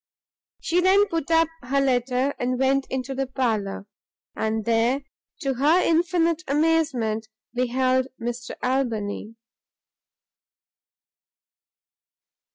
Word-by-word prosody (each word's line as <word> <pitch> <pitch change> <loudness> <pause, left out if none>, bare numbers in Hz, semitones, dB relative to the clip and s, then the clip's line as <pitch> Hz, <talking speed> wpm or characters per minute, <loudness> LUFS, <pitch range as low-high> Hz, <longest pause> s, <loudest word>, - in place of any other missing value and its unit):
She 350 +2 +1
then 385 +3 +5
put 330 -3 -2
up 330 0 +4
her 270 +3 0
letter, 260 0 +1
and 250 +1 0
went 270 +1 +1
into 260 0 -3
the 270 0 -2
parlour; 220 -7 -2 0.5
and 220 -1 -1
there, 235 +4 +2 0.4
to 270 -1 0
her 295 +7 +3
infinite 335 -1 +2
amazement, 280 -8 +1 0.3
beheld 255 +1 +1
Mr 240 +1 -5
Albany. 230 -4 -2
260 Hz, 95 wpm, -24 LUFS, 240-300 Hz, 0.5 s, then